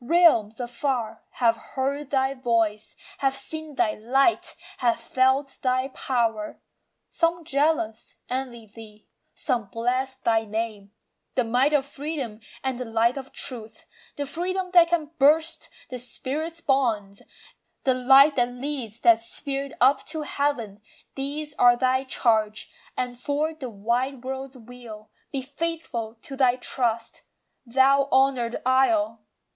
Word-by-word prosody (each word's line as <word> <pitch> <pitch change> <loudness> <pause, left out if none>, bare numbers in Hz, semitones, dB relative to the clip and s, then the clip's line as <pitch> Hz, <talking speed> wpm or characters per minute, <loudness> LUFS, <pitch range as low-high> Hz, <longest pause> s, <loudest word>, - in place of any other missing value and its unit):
Realms 250 -9 +4
afar 240 -2 -2
Have 230 -2 +3 0.2
heard 275 +1 -1
thy 265 -1 +1
voice, 230 -4 0 0.2
have 270 -1 +1
seen 310 +2 -6
thy 215 -4 +2
light, 270 +10 +1 0.2
have 235 -2 +2
felt 265 +3 +1
thy 255 +1 +1
power. 230 -5 -1 0.5
Some, 335 0 0
jealous, 280 -7 0
envy 250 -3 -4
thee; 215 0 -14 0.3
some 235 -4 -1
bless 250 +5 -1
thy 225 -3 +1
name, 215 -2 -4 0.4
The 255 - +3
might 250 +5 +2
of 290 -3 +2
freedom, 280 -6 -5 0.2
and 260 -2 -2
the 250 - -3
light 225 +2 +2
of 270 -1 -7
truth, 225 -4 -6 0.3
The 285 - -3
freedom 365 +5 -3
that 345 -2 +8
can 325 -3 -1
burst 315 +4 +3 0.2
the 250 - -5
spirit's 310 +7 -4
bonds, 225 -9 0 0.6
The 260 - +3
light 270 +3 +6
that 245 -1 +3
leads 245 -3 -5
that 230 -1 +6
spirit 275 +3 -4
up 265 +3 +4
to 310 -1 -3
heaven, 245 -9 -2 0.3
These 290 +2 -5
are 245 0 +6
thy 260 +1 +1
charge, 220 -4 0 0.3
and 245 -1 -3
for 295 +4 -1
the 270 -5 -7
wide 240 +5 -1
world's 265 0 -5
weal, 230 -3 -12 0.2
Be 270 -2 -3
faithful 280 -6 -4
to 275 - -7
thy 255 -2 +4
trust, 235 -2 -2 0.5
thou 275 +3 +4
honour'd 260 -3 +2
Isle! 230 -4 +3
255 Hz, 135 wpm, -25 LUFS, 230-280 Hz, 0.6 s, that